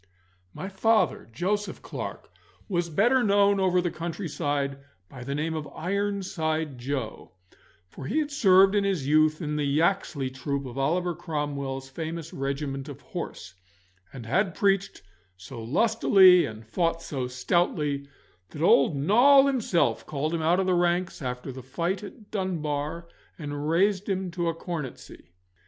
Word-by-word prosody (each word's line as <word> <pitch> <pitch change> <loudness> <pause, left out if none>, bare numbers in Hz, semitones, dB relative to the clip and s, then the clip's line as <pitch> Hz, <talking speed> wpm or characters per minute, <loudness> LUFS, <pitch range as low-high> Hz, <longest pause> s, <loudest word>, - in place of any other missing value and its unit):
My 190 - -6
father, 215 - +1
Joseph 205 - -2
Clarke, - - -7 0.4
was 175 -3 -1
better 240 +11 +3
known 200 -2 +3
over 185 -1 +3
the 175 -1 -1
countryside 145 -5 -3 0.3
by 125 -2 -9
the 140 +2 -3
name 155 +2 -1
of 155 -2 -4
Ironside 175 -7 -2
Joe, 125 -6 -5 0.5
for 130 +9 -9
he 300 - -1
had 300 -2 0
served 195 -8 +5
in 205 -1 +2
his 190 -8 -1
youth 155 +2 +3
in 150 0 -2
the 150 - 0
Yaxley 145 -2 0
troop 140 +1 -3
of 125 -2 -8
Oliver 170 +6 0
Cromwell's 145 -5 -4
famous 160 +3 -6
regiment 135 0 -3
of - - -9
horse, - - -7 0.6
and 125 -4 -9
had 180 - +1
preached 195 - 0 0.3
so 115 +6 -9
lustily 185 - +5
and 110 0 -9
fought 165 +7 -1
so 130 -4 -3
stoutly 140 +1 0 0.4
that 150 - -5
old 145 -3 +5
Noll 245 - +6
himself 245 -10 +1
called 155 +2 -2
him 165 - -1
out 170 +4 +3
of 190 - +1
the 185 - +2
ranks 175 0 0
after 125 0 -4
the 130 +1 -8
fight 170 +9 -2
at 210 +1 -12
Dunbar, 170 -4 -3 0.3
and 145 -1 -4
raised 195 +4 +2
him 190 -2 -2
to 175 0 -2
a 165 - -2
cornetcy. 165 - -7
165 Hz, 150 wpm, -26 LUFS, 140-190 Hz, 0.6 s, Noll